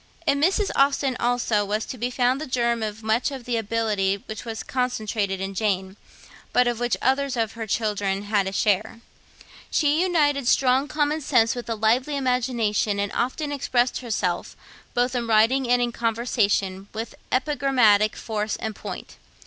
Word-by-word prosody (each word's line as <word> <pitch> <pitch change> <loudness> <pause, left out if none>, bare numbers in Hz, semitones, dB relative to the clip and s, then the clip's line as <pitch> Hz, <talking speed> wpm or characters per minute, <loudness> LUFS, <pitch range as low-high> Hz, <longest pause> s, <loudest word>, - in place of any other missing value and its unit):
In 280 -2 +2
Mrs. 390 +5 +2
Austen 275 -1 +2
also 240 -3 +1
was 210 +2 -2
to - - -6
be 245 +1 -2
found 250 +2 +1
the 310 - -4
germ 235 -2 0
of 215 0 -4
much 220 +5 +1
of 265 -4 -8
the 245 - -1
ability 210 -3 0
which 220 +1 -7
was 225 -2 -5
concentrated 215 -6 -2
in 195 +1 -4
Jane, 190 -2 -1 0.6
but 250 0 +4
of 240 -1 -1
which 240 -1 0
others 265 0 +1
of 225 -1 0
her 225 -1 -6
children 205 -2 -1
had 205 -2 +1
a - - -2
share. 210 +3 0 0.7
She 300 +1 +2
united 295 -7 +2
strong 260 +2 +3
common 300 +1 0
sense 240 -5 +3
with 245 -1 -7
a 230 - 0
lively 240 +7 +1
imagination, 235 -5 0
and 200 0 -1
often 290 +5 -2
expressed 255 -3 0
herself, 205 -8 -2 0.4
both 245 +1 +1
in 240 -2 -2
writing 230 +4 +3
and 245 0 +4
in 240 - -1
conversation, 215 -5 0
with 225 +1 -5 0.2
epigrammatic 255 -7 +3
force 215 -1 -3
and 220 -1 -5
point. - - -8
235 Hz, 165 wpm, -24 LUFS, 215-260 Hz, 0.7 s, but